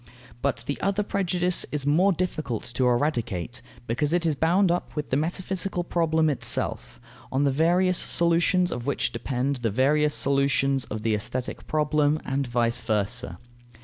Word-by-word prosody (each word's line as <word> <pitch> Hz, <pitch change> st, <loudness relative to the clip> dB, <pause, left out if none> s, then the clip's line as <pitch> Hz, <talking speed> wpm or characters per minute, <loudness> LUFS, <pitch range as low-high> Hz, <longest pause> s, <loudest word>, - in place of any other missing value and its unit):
But 140 Hz, -1 st, -1 dB
the 145 Hz, -, -4 dB
other 200 Hz, +1 st, 0 dB
prejudice 180 Hz, -3 st, 0 dB
is 150 Hz, -2 st, -2 dB
more 170 Hz, +7 st, +4 dB
difficult 155 Hz, -, -3 dB
to 130 Hz, -, +1 dB
eradicate, 120 Hz, -, -1 dB, 0.2 s
because 145 Hz, +7 st, -1 dB
it 175 Hz, -1 st, +1 dB
is 160 Hz, -, +2 dB
bound 175 Hz, +5 st, +2 dB
up 175 Hz, -, -3 dB
with 150 Hz, -1 st, -4 dB
the -, -, +2 dB
metaphysical 180 Hz, +4 st, -2 dB
problem 160 Hz, -2 st, +1 dB
itself, 145 Hz, -4 st, -2 dB, 0.3 s
on 135 Hz, +2 st, +1 dB
the 140 Hz, -, +2 dB
various 175 Hz, +5 st, +3 dB
solutions 175 Hz, +1 st, +2 dB
of 120 Hz, +2 st, -5 dB
which 140 Hz, -, 0 dB
depend 135 Hz, +1 st, -2 dB
the 120 Hz, -2 st, -1 dB
various 145 Hz, +7 st, +2 dB
solutions 140 Hz, -1 st, +2 dB
of 110 Hz, 0 st, -6 dB
the 110 Hz, -1 st, +1 dB
aesthetic 120 Hz, +5 st, -4 dB
problem, 150 Hz, 0 st, +1 dB
and 135 Hz, 0 st, -1 dB
vice 120 Hz, -1 st, 0 dB
versa. 110 Hz, +1 st, -1 dB
145 Hz, 155 wpm, -25 LUFS, 125-175 Hz, 0.3 s, more